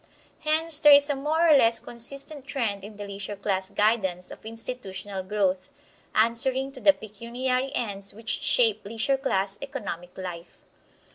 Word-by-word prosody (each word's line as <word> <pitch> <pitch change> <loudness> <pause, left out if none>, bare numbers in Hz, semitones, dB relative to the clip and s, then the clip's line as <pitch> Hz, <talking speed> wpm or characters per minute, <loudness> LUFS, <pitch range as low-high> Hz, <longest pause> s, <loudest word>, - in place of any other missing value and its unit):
Hence 315 0 +4
there 295 -2 +8
is 285 +1 +7
a - - -1
more 310 +5 +1
or 310 - +7
less 230 -4 +5
consistent 275 +4 -2
trend 220 -8 -2
in 210 +1 -10
the 205 - -6
leisure 200 0 -5
class 195 -1 -1
guidance 200 -4 0
of - - -11
institutional 205 -4 -5
growth, 185 -1 -1 0.5
answering 255 +4 +2
to - - -12
the 295 - +7
pecuniary 250 +4 -3
ends 200 -4 -3
which 225 +1 -3
shape 235 -7 +3
leisure 225 +6 0
class 200 -7 -1
economic 185 - -7
life. 180 -2 -9
225 Hz, 150 wpm, -26 LUFS, 200-270 Hz, 0.5 s, there